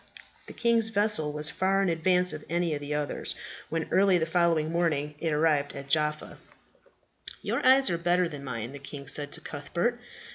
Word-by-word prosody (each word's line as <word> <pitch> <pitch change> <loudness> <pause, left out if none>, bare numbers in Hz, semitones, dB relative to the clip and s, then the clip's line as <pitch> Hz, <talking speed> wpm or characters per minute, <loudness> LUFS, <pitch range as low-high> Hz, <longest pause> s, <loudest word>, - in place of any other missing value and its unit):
The - - -9
king's 230 -2 +2
vessel 205 -8 +1
was 150 +1 -2
far 195 +1 +1
in - - +1
advance 180 +1 +2
of 155 -1 -7
any 170 -1 0
of 145 - -3
the 145 +1 -3
others, 150 -1 -2 0.3
when 160 0 -2
early 190 -1 +4
the 160 - 0
following 165 -2 +2
morning 155 -4 0
it 165 -1 -1
arrived 150 -2 +1
at 140 0 -8
Jaffa. 150 +1 0 1.0
"Your - - -1
eyes 265 -3 +6
are 170 - -1
better 175 +1 +2
than 145 -3 -8
mine," 115 -2 -5
the 140 - -8
king 140 0 -8
said 145 0 -2
to - - -4
Cuthbert. 170 +11 -2
160 Hz, 185 wpm, -28 LUFS, 150-180 Hz, 1.0 s, eyes